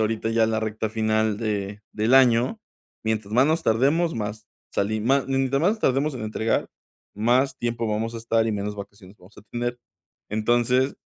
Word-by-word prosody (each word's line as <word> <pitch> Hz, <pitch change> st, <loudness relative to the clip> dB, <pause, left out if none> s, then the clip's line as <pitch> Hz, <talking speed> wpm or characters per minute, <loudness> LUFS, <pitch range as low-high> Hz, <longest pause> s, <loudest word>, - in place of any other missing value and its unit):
ahorita 110 Hz, +1 st, 0 dB
ya 115 Hz, 0 st, +3 dB
es 110 Hz, -, +1 dB
la 110 Hz, 0 st, 0 dB
recta 110 Hz, 0 st, -2 dB
final 110 Hz, -1 st, +1 dB
de 105 Hz, -2 st, -3 dB
del 110 Hz, +4 st, +2 dB
año. 125 Hz, -, +4 dB, 0.4 s
Mientras 110 Hz, -2 st, -2 dB
más 130 Hz, -, +5 dB
nos 160 Hz, +2 st, +1 dB
tardemos, 145 Hz, +9 st, +2 dB
más 105 Hz, 0 st, -5 dB, 0.3 s
sali 110 Hz, +2 st, 0 dB
más 135 Hz, +4 st, +2 dB
mientras 135 Hz, 0 st, +1 dB
más 180 Hz, +6 st, +4 dB
nos 220 Hz, -, -7 dB
tardemos 140 Hz, 0 st, +1 dB
en 125 Hz, -, -6 dB
entregar, 110 Hz, +1 st, -1 dB, 0.5 s
más 125 Hz, +6 st, +2 dB
tiempo 120 Hz, -1 st, -2 dB
vamos 110 Hz, +2 st, -2 dB
a -, -, -4 dB
estar 115 Hz, 0 st, +1 dB
y 110 Hz, -, 0 dB
menos 105 Hz, 0 st, -3 dB
vacaciones 100 Hz, -1 st, -11 dB
vamos 90 Hz, +4 st, -19 dB
a 105 Hz, -, -13 dB
tener. 120 Hz, 0 st, -3 dB, 0.5 s
Entonces, 120 Hz, +5 st, +1 dB
115 Hz, 185 wpm, -24 LUFS, 110-125 Hz, 0.5 s, más